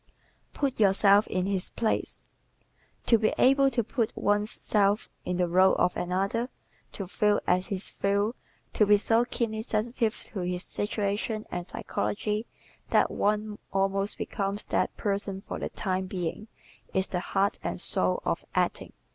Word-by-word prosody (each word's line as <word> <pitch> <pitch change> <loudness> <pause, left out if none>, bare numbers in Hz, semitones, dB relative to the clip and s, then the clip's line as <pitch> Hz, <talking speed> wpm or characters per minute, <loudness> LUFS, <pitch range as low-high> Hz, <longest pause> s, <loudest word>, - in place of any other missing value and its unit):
"Put 275 -5 -1
Yourself 200 0 +5
in 185 0 -1
His 195 -2 -1
Place" 225 -2 -2 0.8
¶ - - -33
To 230 - +5
be 215 - +1
able 275 +1 +5
to 235 -2 0
put 230 0 -1
one's 205 +1 +1
self 205 -2 +1 0.2
in 180 - -1
the 180 -1 +2
role 185 +2 +5
of 180 - +2
another, 195 +7 -1 0.4
to 195 - -4
feel 205 +2 +2
as 180 +1 +2
he 195 - -2
feels; 200 +3 0 0.4
to 210 - +3
be 205 0 +7
so 225 +3 +3
keenly 230 -3 -2
sensitive 225 +1 -1 0.2
to 205 - -3
his 180 0 -2
situation 210 +1 -2
and 175 0 -4
psychology 210 +3 -2 0.4
that - - +3
one 210 0 0
almost 195 +1 +2
becomes 200 +1 -2
that - - -1
person 200 -1 -2
for 195 - -6
the - - -3
time 185 -1 -2
being, 185 +3 -4 0.5
is 190 0 +3
the 180 - -1
heart 195 +3 0
and - - -3
soul - - +1
of - - -1
acting. - - 0
205 Hz, 155 wpm, -28 LUFS, 190-220 Hz, 0.8 s, be